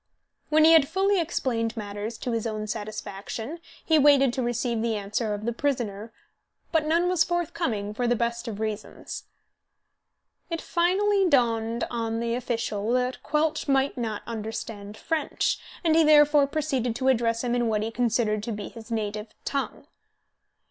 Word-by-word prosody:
When 310 0 +5
he 325 - +8
had 310 -4 +6
fully 390 +3 +2
explained 235 -8 -1
matters 205 +2 -5
to 250 - -3
his 230 0 -1
own 215 -1 -3
satisfaction 215 - -5 0.3
he 315 -1 +4
waited 275 -3 +5
to 260 - -1
receive 240 -1 -1
the 230 -1 0
answer 210 +1 -2
of 210 +1 -7
the 235 - 0
prisoner; 230 -5 -2 0.6
but 315 -2 +2
none 335 +3 +3
was 360 -2 +3
forthcoming, 315 - -2
for 245 +3 -1
the 240 - +3
best 235 +1 -2
of 215 -3 -5
reasons. 215 -1 -5 1.2
It 335 -1 -2
finally 380 +3 +2
dawned 230 -4 +2
on 230 -1 -2
the 235 0 -1
official 225 -3 -2
that 250 0 0
Quelch 310 +1 0
might 270 0 +2
not 225 -5 -3
understand 220 -2 -6
French, 320 -3 -1 0.2
and 320 -2 +3
he 325 - +6
therefore 295 -2 +6
proceeded 270 -6 -1
to 260 +2 -1
address 230 -2 +2
him 240 -1 0
in 240 -1 +1
what 215 -1 +1
he 225 - -3
considered 225 -3 +1
to 230 - -4
be 210 -1 -5
his 230 -1 -12
native 215 -1 -3
tongue. 275 -1 -3
235 Hz, 160 wpm, -26 LUFS, 220-295 Hz, 1.2 s, he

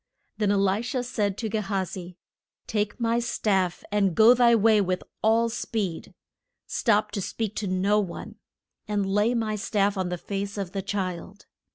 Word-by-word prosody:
Then 210 -2 +2
E - - +3
li 195 +1 +2
sha 245 +1 -2
said 210 -6 -1
to 225 - -2
Ge 220 +1 -1
ha 195 -2 -1
zi, 180 -1 -8 0.5
Take 210 +1 -2
my 230 0 +1
staff, 195 -6 0
and 200 -4 +2
go 225 +2 +8
thy 240 -1 +5
way 220 -1 +4
with 185 -1 -1 0.2
all 225 +2 +3
speed. 215 -6 -4 0.5
Stop 215 -3 +1
to 200 - -3
speak 215 +2 -3
to 205 - -2
no 190 +3 +2
one. 190 -5 -6 0.5
And 205 -2 0
lay 205 +5 +2
my 220 -2 -1
staff 205 -1 0
on 185 -1 -1
the 180 - -3
face 200 +3 -4
of 195 -3 -3
the 195 -1 -3
child. 190 0 -4
205 Hz, 180 wpm, -26 LUFS, 195-220 Hz, 0.5 s, go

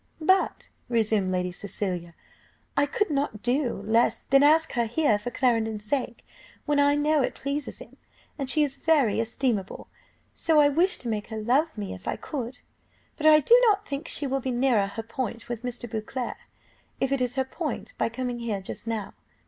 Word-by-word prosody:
"But," 375 +4 +2 0.2
resumed 220 -5 +1
Lady 180 0 -1
Cecilia, 180 -3 -4 0.6
"I 285 0 +3
could 375 +5 -1
not 275 -7 -2
do 245 -4 0
less 230 +2 +2
than 275 +1 +4
ask 315 +2 +4
her 235 -2 0
here 230 -2 +2
for 210 - -4
Clarendon's 225 -4 0
sake, 240 0 -2 0.4
when 290 -1 +1
I 285 0 +4
know 300 0 +2
it - - -1
pleases 280 +1 -4
him; - - -13 0.4
and 275 -3 -3
she 305 +2 +5
is 275 -2 -3
very 280 -11 +2
estimable, 225 -3 -2
and - - -37 0.4
so 320 -2 +4
I 290 -1 +6
wish 345 +6 +2
to 245 - -7
make 215 -2 -2
her 220 - -6
love 255 +7 +1
me 205 -2 -4
if 95 0 -11
I - - 0
could! 245 -3 -6 0.5
But 310 - +1
I 305 0 +8
do 460 - +6
not 415 -1 +2
think 280 +3 -4
she 290 - +1
will 270 0 0
be 260 - -3
nearer 240 -5 +2
her 225 +3 -6
point 230 0 -5
with 240 -2 -4
Mr. 245 -1 -5
Beauclerc, 225 +3 -4 0.6
if 270 - 0
it 275 -2 +1
is 250 0 -1
her 265 -1 +1
point, 300 0 -5
by - - +1
coming 245 0 -4
here 225 -4 -2
just 190 +4 -8
now. 220 -3 -3
250 Hz, 195 wpm, -26 LUFS, 220-285 Hz, 0.6 s, I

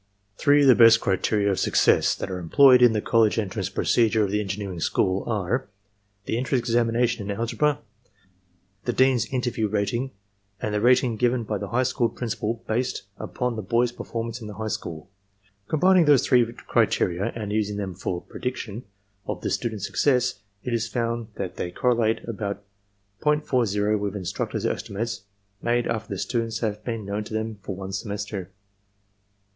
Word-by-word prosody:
"Three 145 +4 +4
of - - +5
the 130 - +9
best 115 -1 +7
criteria 100 +2 +1
of 95 - -1
success - - +3
that - - -5
are 90 - -3
employed 125 - +6
in 120 -2 +7
the 105 - -1
college 115 -2 +3
entrance 105 -4 -2
procedure 110 -2 +2
of 100 - -1
the 105 - +1
engineering 95 -2 -4
school 95 +3 +1
are: 110 +3 -1 0.6
the 115 - -1
entrance 130 +1 +1
examination 115 -2 +1
in 100 - -2
algebra, 145 +6 +1 1.1
the 120 - 0
dean's 130 -2 +3
interview 120 -4 -1
rating, 110 +5 -1 0.5
and 105 - -3
the 105 - 0
rating 125 -1 +3
given 120 +1 +1
by 105 -2 -3
the 100 - -4
high 125 +4 +1
school 125 -2 +1
principal 115 -1 -3
based 125 +2 -1 0.2
upoii 125 -1 -3
the 110 - -3
boy's 120 +4 +1
performance 115 0 -5
in 110 - -7
the 105 - -8
high 110 +2 -4
school. 85 -6 -5 0.6
Combining 180 +2 +4
those 145 -4 +5
three 120 -2 +3
criteria 90 +2 +1
and 105 -3 -4
using 105 -1 -1
them 95 -2 -3
for 90 -1 -4
prediction 125 -3 -5 0.4
of 105 -4 -4
the - - -2
students' 110 -5 -2
success, 125 -1 +1 0.2
it 125 - -3
is 115 0 0
found 115 -1 -2
that 95 -2 -5
they 90 - -3
correlate 115 +2 +1
about 100 -2 -4 0.6
.40 115 -9 +1
with 100 0 -3
instructors' 95 -4 -3
estimates 100 -1 -3 0.4
made 120 0 +1
after 110 -1 -3
the 100 - -3
students 115 +1 -2
have 105 -2 -2
been 115 -3 -4
known 100 +2 -3
to 110 - -7
them 110 -1 -3
for 95 0 -5
one 95 0 -6
semester. 100 -2 -4
110 Hz, 170 wpm, -25 LUFS, 100-120 Hz, 1.1 s, the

